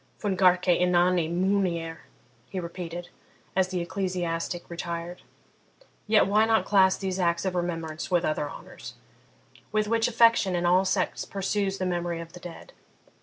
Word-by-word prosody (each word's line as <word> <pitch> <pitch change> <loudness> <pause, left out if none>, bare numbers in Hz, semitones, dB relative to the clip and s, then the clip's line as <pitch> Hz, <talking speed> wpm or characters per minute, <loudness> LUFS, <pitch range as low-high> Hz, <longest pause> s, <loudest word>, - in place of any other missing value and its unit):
'Fun 205 -3 -1
garque 180 -1 +4 0.2
inani 180 -2 +3
munere,' 175 -3 0 0.5
he 190 - -4
repeated, 175 0 -6 0.5
as 190 -1 +3
the 185 -1 -3
ecclesiastic 175 -2 -3
retired. 170 0 -5 0.9
'Yet 215 0 +5
why 210 +3 +3
not 225 -1 +2
class 190 -2 +4
these 190 -1 -3
acts 170 0 +1
of 190 - 0
remembrance 165 -3 -3
with 175 -2 +2
other 150 -1 -1
honours, - - -10 0.8
with 215 -1 +1
which 230 +1 +2
affection 230 -5 +4
in 175 0 0
all 180 +2 +4
sects 185 -1 0
pursues 195 0 -2
the 185 - -2
memory 175 -1 -2
of 165 +1 -9
the 180 - -10
dead?' 175 -2 -11
180 Hz, 150 wpm, -27 LUFS, 170-195 Hz, 0.9 s, Yet